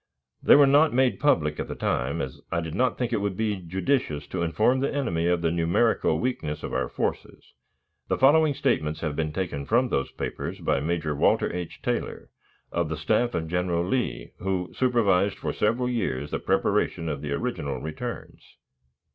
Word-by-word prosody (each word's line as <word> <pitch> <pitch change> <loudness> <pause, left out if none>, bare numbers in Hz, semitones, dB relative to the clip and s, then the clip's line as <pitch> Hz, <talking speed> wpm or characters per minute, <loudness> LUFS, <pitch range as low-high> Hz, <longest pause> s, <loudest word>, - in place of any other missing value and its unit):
They - - +7
were 145 - +7
not 145 0 +4
made 130 -1 +2
public 80 - +2
at - - -3
the - - -5
time, 70 +6 -1
as 65 -1 -7
I - - +1
did 80 -2 -5
not 125 +3 +1
think 125 -1 -2
it 110 - +2
to 100 0 0
be 105 +1 -1
judicious 90 - -1
to 90 - -3
inform 110 +10 +2
the 135 - 0
enemy 85 -13 -1
of 90 -1 +1
the 80 - +2
numerical 85 +7 +2
weakness 75 -12 -3
of - - -5
our 65 -1 -1
forces. - - -4 0.5
The - - 0
following 145 +2 +5
statements 75 - 0
have 75 -3 -2
been 75 -1 -1
taken 80 -4 -3
from 125 +3 +3
those 70 - 0
papers - - -5
by - - +1
Major 80 0 -1
Walter - - +2
H. 90 -1 -6
Taylor, - - -3 0.4
of 85 -2 -1
the 80 - -3
staff 110 +10 +1
of 80 -1 -2
General 90 0 0
Lee, 105 - -2
who 90 -1 -2
supervised 105 -6 +2
for - - -3
several 115 +4 +1
years 75 - -2
the - - -1
preparation 85 - 0
of 70 -3 -3
the 75 -1 -4
original 70 -1 -3
returns. 115 - -6
90 Hz, 185 wpm, -26 LUFS, 80-120 Hz, 0.5 s, They